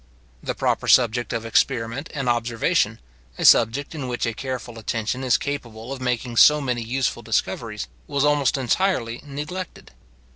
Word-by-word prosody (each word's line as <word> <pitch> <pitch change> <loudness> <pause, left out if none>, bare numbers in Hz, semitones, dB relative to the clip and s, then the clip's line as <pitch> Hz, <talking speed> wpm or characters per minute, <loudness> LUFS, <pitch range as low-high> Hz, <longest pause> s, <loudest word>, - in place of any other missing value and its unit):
The - - -3
proper - - 0
subject 120 -1 +4
of 115 - -3
experiment 120 +5 0
and 135 -3 -2
observation, 120 -1 +1 0.4
a - - -2
subject 125 +7 +5
in 145 -5 -5
which 125 0 -2
a 115 - -2
careful 125 -2 -6
attention 115 +3 -2
is 130 - +3
capable 125 -4 -5
of 135 - -8
making 125 -1 -2
so 150 +4 +7
many 125 -4 -2
useful 125 +3 -1
discoveries, 65 - -2 0.2
was 140 0 +1
almost 145 -1 +2
entirely 125 -3 0
neglected. 150 +6 -7
125 Hz, 150 wpm, -23 LUFS, 115-140 Hz, 0.4 s, so